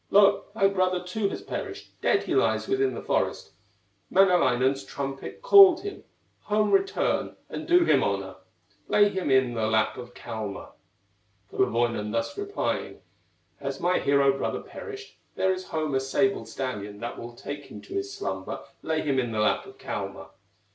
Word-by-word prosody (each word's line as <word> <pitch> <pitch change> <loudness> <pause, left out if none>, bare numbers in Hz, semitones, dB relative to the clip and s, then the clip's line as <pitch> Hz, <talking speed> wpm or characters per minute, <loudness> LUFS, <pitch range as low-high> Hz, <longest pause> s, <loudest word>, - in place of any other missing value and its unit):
thy 200 +1 +4
brother 185 -2 0
too 200 +3 -1
has - - -6
perished, 405 -4 -6
Dead - - +2
he - - -2
lies - - +2
within 395 0 +1
the - - -6
forest, - - -1 0.6
Manalainen's 135 -8 +3
trumpet 135 - -6
called 395 -7 +8
him; 405 -1 -7 0.4
Home 210 0 +2
return 390 +1 +1
and - - -6
do 350 0 +5
him - - +4
honor, - - -2 0.5
Lay 205 0 +5
him 190 -6 -2
in 130 -2 +3
the 110 -2 0
lap 110 0 +1
of 125 0 -9
Kalma." 110 -4 -6 0.8
Kullerwoinen 115 -3 0
thus 115 0 -2
replying: 405 0 -3 0.6
"Has - - -4
my 180 +1 +2
hero 140 -1 +3
brother - - -2
perished, 415 -2 -10 0.2
There 190 0 +2
is 185 0 -6
home 155 -3 -2
a 135 - +3
sable 135 - 0
stallion 105 -4 -5
That 120 +1 -5
will 120 0 -8
take 145 +3 -7
him - - -10
to 375 - -11
his 390 0 -2
slumber, 405 0 -4 0.2
Lay 160 0 -1
him 140 -3 +1
in 120 -2 -1
the 110 - -2
lap 105 - +1
of - - -13
Kalma." - - -6
160 Hz, 160 wpm, -26 LUFS, -, 0.8 s, called